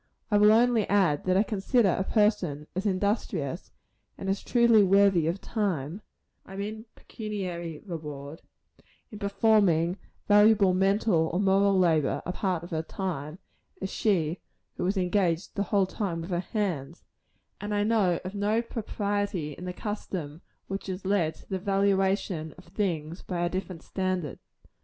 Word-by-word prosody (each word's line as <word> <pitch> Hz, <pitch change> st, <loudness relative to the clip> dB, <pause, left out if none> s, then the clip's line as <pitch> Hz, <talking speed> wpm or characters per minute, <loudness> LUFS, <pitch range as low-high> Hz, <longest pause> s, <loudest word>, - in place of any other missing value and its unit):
I 205 Hz, -, +5 dB
will 210 Hz, +1 st, +7 dB
only 230 Hz, -1 st, +3 dB
add, 185 Hz, -8 st, +2 dB
that 185 Hz, 0 st, +3 dB
I 200 Hz, -, +5 dB
consider 215 Hz, +1 st, +2 dB
a 185 Hz, -, +1 dB
person 185 Hz, -9 st, +1 dB
as 190 Hz, +3 st, -1 dB
industrious, 185 Hz, -, -1 dB, 0.5 s
and 195 Hz, -, -2 dB
as 195 Hz, -, -2 dB
truly 235 Hz, -3 st, +5 dB
worthy 195 Hz, -4 st, +4 dB
of 170 Hz, +4 st, -1 dB
reward 185 Hz, -, -2 dB, 0.4 s
I 195 Hz, -, -11 dB
mean 215 Hz, +3 st, -5 dB
pecuniary 180 Hz, -7 st, -6 dB
reward 150 Hz, -4 st, -7 dB, 0.7 s
in 210 Hz, -, -9 dB
performing 200 Hz, -4 st, +2 dB, 0.3 s
valuable 205 Hz, -2 st, +5 dB
mental 195 Hz, -3 st, +2 dB
or 175 Hz, -, -1 dB
moral 195 Hz, 0 st, +3 dB
labor 160 Hz, -6 st, +2 dB
a 180 Hz, -, -2 dB
part 185 Hz, -3 st, -2 dB
of 170 Hz, -, -10 dB
her 160 Hz, -1 st, -1 dB
time, 160 Hz, -3 st, -5 dB, 0.4 s
as 190 Hz, +1 st, -4 dB
she 180 Hz, -7 st, 0 dB, 0.3 s
who -, -, -2 dB
is 195 Hz, +2 st, 0 dB
engaged 180 Hz, -2 st, 0 dB
the 200 Hz, -, -2 dB
whole 200 Hz, -2 st, +3 dB
time 185 Hz, -3 st, -3 dB
with 170 Hz, +3 st, -7 dB
her 175 Hz, -, 0 dB
hands; 175 Hz, -, -3 dB, 0.6 s
and 205 Hz, 0 st, -4 dB
I 205 Hz, 0 st, +1 dB
know 210 Hz, -5 st, +2 dB
of 185 Hz, -, -5 dB
no 210 Hz, +3 st, +1 dB
propriety 205 Hz, -7 st, -2 dB
in 180 Hz, -, -9 dB
the 180 Hz, -, -3 dB
custom 180 Hz, -6 st, -5 dB, 0.2 s
which 195 Hz, +1 st, -5 dB
has 185 Hz, 0 st, -5 dB
led 180 Hz, -5 st, +1 dB
to -, -, -19 dB
the 190 Hz, -, -3 dB
valuation 195 Hz, -4 st, 0 dB
of 180 Hz, -, -14 dB
things 170 Hz, -5 st, -2 dB
by 175 Hz, -2 st, -4 dB
a -, -, 0 dB
different 185 Hz, -2 st, -5 dB
standard. 185 Hz, -6 st, -2 dB
190 Hz, 155 wpm, -28 LUFS, 170-205 Hz, 0.7 s, will